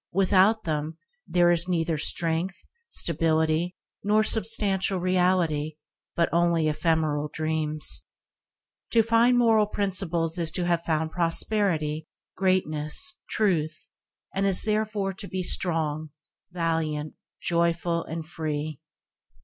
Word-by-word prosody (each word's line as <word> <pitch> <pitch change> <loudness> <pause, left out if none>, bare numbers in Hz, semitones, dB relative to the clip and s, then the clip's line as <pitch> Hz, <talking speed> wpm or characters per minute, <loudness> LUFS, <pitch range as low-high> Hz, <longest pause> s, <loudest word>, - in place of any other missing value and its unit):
Without 195 +3 +4
them 155 -1 -3 0.3
there 175 -1 +4
is 170 +1 +2
neither 165 -2 0
strength, 165 +4 -1 0.2
stability, 160 +1 0 0.3
nor 210 +1 +3
substantial 205 -3 +1
reality, 180 -4 +1 0.4
but 170 - +2
only 170 -2 +2
ephemeral 155 -1 0
dreams. 155 -1 +1 0.9
To 230 -1 +5
find 230 +2 +4
moral 225 -3 +4
principles 180 -5 -1
is 165 -2 0
to 180 0 0
have 170 -1 +1
found 160 -1 -1
prosperity, 165 -3 0 0.3
greatness, 185 - 0 0.2
truth, 160 -7 0 0.5
and 195 +1 +1
is 190 -2 +1
therefore 215 -2 -1
to 195 +1 -7
be 185 -1 -3
strong, 155 -4 0 0.4
valiant, 160 -3 -2 0.3
joyful 170 0 0
and 160 0 -6
free. 155 -3 -4
170 Hz, 110 wpm, -26 LUFS, 160-190 Hz, 0.9 s, To